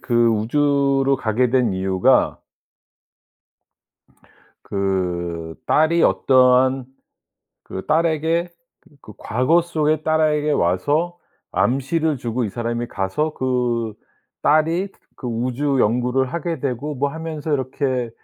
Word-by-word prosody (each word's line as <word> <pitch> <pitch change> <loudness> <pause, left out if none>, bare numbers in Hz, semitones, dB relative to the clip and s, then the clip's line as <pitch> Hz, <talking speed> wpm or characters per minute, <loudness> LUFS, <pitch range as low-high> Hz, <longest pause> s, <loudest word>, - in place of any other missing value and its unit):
그 120 -1 +2
우주로 140 +4 +2
가게 115 +2 +1
된 125 -5 +2
이유가 95 0 +2 2.2
그 85 -4 -2
딸이 165 +2 +3
어떠한 130 0 +3 0.8
그 95 - -7
딸에게 165 +2 +1 0.5
그 105 - -13
과거 130 +10 +2
속에 155 -2 0
딸에게 155 -1 +1
와서 145 - 0 0.3
암시를 140 +4 0
주고 120 +1 -2
이 105 - -2
사람이 120 +2 -3
가서 100 +12 -2
그 120 -4 -1 0.5
딸이 165 +6 +2 0.3
그 125 - -7
우주 130 +4 -1
연구를 125 +4 +1
하게 170 -2 -3
되고 140 +2 -3
뭐 140 +2 0
하면서 160 -1 -5
이렇게 130 -2 -1
130 Hz, 200 characters per minute, -21 LUFS, 115-155 Hz, 2.2 s, 딸이